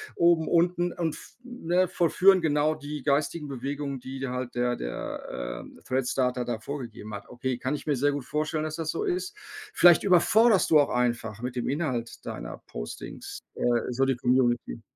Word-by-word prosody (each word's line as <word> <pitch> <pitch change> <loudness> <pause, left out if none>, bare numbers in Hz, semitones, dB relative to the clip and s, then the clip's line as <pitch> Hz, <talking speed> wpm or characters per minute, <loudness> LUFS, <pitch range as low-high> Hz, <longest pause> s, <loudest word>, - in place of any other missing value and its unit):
oben, 170 -2 +4
unten 175 +1 +2
und 165 -3 -2
f - - -13
ne, 185 -7 0
vollführen 185 +2 +4
genau 150 0 +2
die 145 -1 -7
geistigen 150 +1 0
Bewegungen, 140 +1 -4
die 130 +1 -7
d 135 - -2
halt 125 -1 -4
der 120 0 +1
der, - - -5
ähm, - - -14
Thread-Starter 125 -1 0
da 120 -2 -2
vorgegeben 115 -5 -7
hat. 100 0 -7
Okay, 125 0 -3
kann 130 +4 -2
ich - - -8
mir 145 -3 +1
sehr 145 +2 +2
gut 145 -3 -3
vorstellen, 155 +2 -2
dass 155 0 -4
das 160 -1 -2
so - - -2
ist. 375 +1 -2 0.4
Vielleicht 175 -2 +7
überforderst 200 +3 +5
du 155 - +8
auch 145 - +3
einfach 120 -3 -1
mit 125 0 -4
dem 120 - -1
Inhalt 130 -6 -3
deiner - - -6
Postings, - - -8 0.2
äh, - - -4 0.3
so 130 +2 +1
die 135 -1 +1
Community. 120 - +1
140 Hz, 180 wpm, -27 LUFS, 125-165 Hz, 0.4 s, du